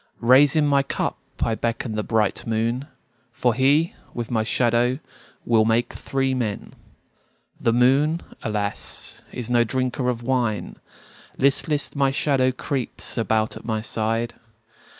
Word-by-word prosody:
Raising 140 +6 +5
my 140 -1 +4
cup 140 - -3 0.2
I 115 - +1
beckon 115 0 -2
the 110 - -1
bright 110 -1 0
moon, 115 +4 -1 0.4
For 120 +1 +1
he, 140 +6 +3 0.2
with 120 0 -4
my 115 -2 +2
shadow, 120 +2 +2 0.5
will 115 -2 +4
make 115 +2 +1
three 135 -1 -1
men. 115 -5 -3 0.9
The 115 - +2
moon, 135 +7 +3 0.2
alas, 105 -2 -3
is 125 -1 -4
no 120 -1 +5
drinker 130 +2 -1
of 120 -1 -3
wine; 120 -4 -1 0.6
Listless, 145 +2 +1
my 140 -1 +3
shadow 135 -2 +2
creeps 130 0 -3
about 110 0 0
at - - -9
my 110 -2 -2
side. 115 +1 -1
120 Hz, 130 wpm, -23 LUFS, 115-135 Hz, 0.9 s, Raising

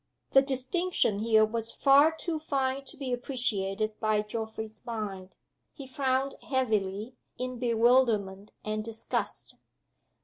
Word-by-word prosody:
The 270 - +7
distinction 270 - 0
here 220 0 +4
was 225 +1 -3
far 280 +3 +5
too 320 0 -4
fine 275 -2 -1
to - - -11
be 265 -3 -3
appreciated 215 -5 -1
by 215 -1 +1
Geoffrey's 220 0 -6
mind. 205 -6 -5 0.4
He 275 - -9
frowned 265 0 0 0.2
heavily, 220 -3 -1 0.2
in 255 -1 -4
bewilderment 230 -4 +2 0.2
and 215 0 -2
disgust. 225 0 -4
235 Hz, 115 wpm, -29 LUFS, 215-265 Hz, 0.4 s, The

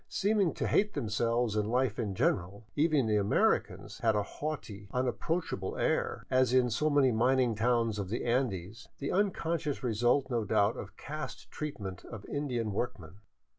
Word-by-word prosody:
Seeming 200 -3 +1
to - - -2
hate 210 +1 +2
themselves 115 -2 0
and 105 -1 +1
Hfe 125 -2 +1
in 105 -5 -2
general, 100 +4 0
even 150 -3 +3
the 105 -1 +2
Americans 100 0 +1
had 110 -2 +2
a 105 - +1
haughty, 110 -7 -6
unapproachable 125 - -2
air, - - 0
as 130 -1 +3
in 125 -2 +4
so 150 +8 +1
many 140 -3 +4
mining 125 +1 +3
towns 115 -1 +1
of 95 -2 -3
the 115 - -2
Andes, 110 -4 -1
the 140 - -3
unconscious 170 -7 0
result 120 +3 +2
no 120 -4 0
doubt 100 +1 +2
of - - -8
caste 155 +2 -7
treatment 100 -12 -5
of 110 -4 -9
Indian 125 -7 -2
workmen. 95 -5 -4
120 Hz, 160 wpm, -31 LUFS, 105-140 Hz, -, in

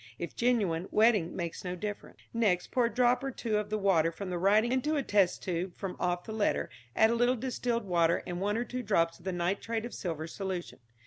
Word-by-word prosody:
If 170 - -6
genuine, 200 -8 +1
wetting 215 -6 +3
makes 170 -3 -4
no 180 -1 -3
difference. 205 +3 -6 0.2
Next, 205 -6 +1
pour 250 -2 +3
a - - +1
drop 245 +2 +3
or 270 - -1
two 220 -5 -1
of 210 -1 -4
the 215 - 0
water 180 -5 +3
from 185 +2 -6
the 175 - -2
writing 210 +6 +4
into 260 +4 +1
a 285 - 0
test 200 -6 +2
tube 180 0 -2
from 195 -2 -4
off 175 0 0
the - - -8
letter, 215 -2 0 0.2
add 220 +1 +5
a - - +2
little 245 +2 +3
distilled 240 -2 -2
water 170 -2 +2
and 175 0 -4
one 205 +2 0
or 235 - 0
two 255 +1 -4
drops 170 -7 +1
of 175 - -19
the 190 - -1
nitrate 200 +6 -1
of 240 - -7
silver 160 -4 -4
solution. 185 -1 -5
200 Hz, 230 wpm, -30 LUFS, 175-235 Hz, 0.2 s, add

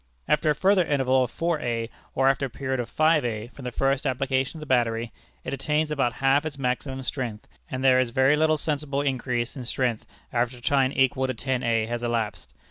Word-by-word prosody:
After 150 +1 +2
a 150 - +3
further 190 +3 +4
interval 130 -4 +2
of 125 - -4
4_a_ 125 -9 -1 0.3
or 135 0 +3
after 135 0 +2
a - - -13
period 130 +1 -3
of 120 - -3
5_a_ 120 -8 +1
from 135 - -10
the 125 - -3
first 135 +4 0
application 130 +2 -1
of - - -9
the - - -6
battery, 115 -3 +1 0.3
it - - -4
attains 150 +3 0
about 135 -5 +1
half 135 +1 +2
its 155 -2 -5
maximum 130 +1 -2
strength, 120 -6 -4 0.2
and 130 0 -4
there 130 -1 +6
is 130 -2 +1
very 130 +4 +4
little 155 0 +3
sensible 145 -2 -2
increase 125 -3 -1
in 130 - -6
strength 120 -2 -1 0.3
after 120 +1 0
a - - -13
time 135 +1 +2
equal 130 0 +2
to 130 - -3
10_a_ 115 -3 0
has 120 0 -3
elapsed. 115 -3 -2
130 Hz, 205 wpm, -25 LUFS, 120-140 Hz, 0.3 s, there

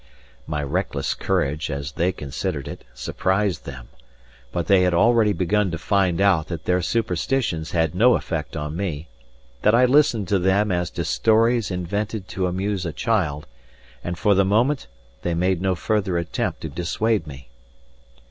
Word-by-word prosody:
My 75 -2 -2
reckless 70 -3 -1
courage, 80 -5 -1
as 70 +1 -4
they 85 +4 0
considered 75 -1 -4
it, - - -8
surprised 95 +7 -1
them; 65 -4 -9 0.6
but 85 +3 -2
they 95 -2 +5
had 90 -1 +2
already 110 +2 +4
begun 100 +2 +1
to 85 - -3
find 95 -1 +1
out 95 -6 +3
that 85 -1 -6
their 90 0 +2
superstitions 90 - -1
had 80 -2 0
no 120 +7 +5
effect 80 -2 -3
on 75 +1 -4
me, 85 -4 -4 0.5
that 105 +2 +4
I 125 +2 +5
listened 125 -6 +3
to 100 - +3
them 95 +3 +2
as 90 -1 0
to 85 -2 -4
stories 115 +5 +2
invented 100 +3 -3
to 95 -1 -1
amuse 95 +1 -2
a 85 - -3
child, 85 -11 -1 0.6
and 85 0 -4
for 105 +3 +3
the 95 0 +4
moment 115 - +1 0.3
they 85 -1 -1
made 90 +1 +1
no 95 -1 +1
further 95 -2 0
attempt 85 -1 -2
to 80 - -4
dissuade 90 +4 -1
me. 65 -3 -11
90 Hz, 165 wpm, -23 LUFS, 80-105 Hz, 0.6 s, they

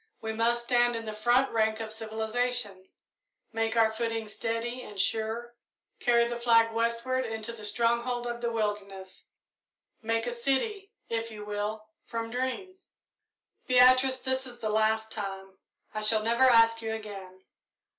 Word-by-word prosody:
We 220 0 -4
must 235 +2 +1
stand 240 0 +2
in 225 0 -4
the 215 - -4
front 240 +5 +2
rank 220 -1 +1
of 220 -1 -5
civilisation, 220 -2 -3 0.6
make 225 0 -1
our 225 -1 +5
footing 225 0 -3
steady 230 +3 -3
and 205 -5 -9
sure, 225 +3 -1 0.5
carry 235 -1 +3
the 240 0 -4
flag 230 -1 +4
westward 235 +3 0
into 225 -1 -4
the 220 -2 -11
stronghold 235 +3 0
of 240 0 -4
the 235 -1 -1
wilderness 200 -4 -4 0.8
make 225 0 0
a 245 - -2
city, 275 - -1 0.2
if 230 0 -2
you 210 -2 -8
will, 210 +1 -3 0.2
from 230 -1 -5
dreams. 260 +10 -4 0.8
"Beatrice, 255 +1 +6
this 260 0 -1
is 240 -1 -9
the 215 -2 -2
last 220 +1 +1
time 195 -3 -6 0.3
I 215 - -3
shall 215 0 +3
never 235 +3 +3
ask 230 -2 +5
you 220 0 -3
again. 195 -4 -9
230 Hz, 150 wpm, -29 LUFS, 220-240 Hz, 0.8 s, Beatrice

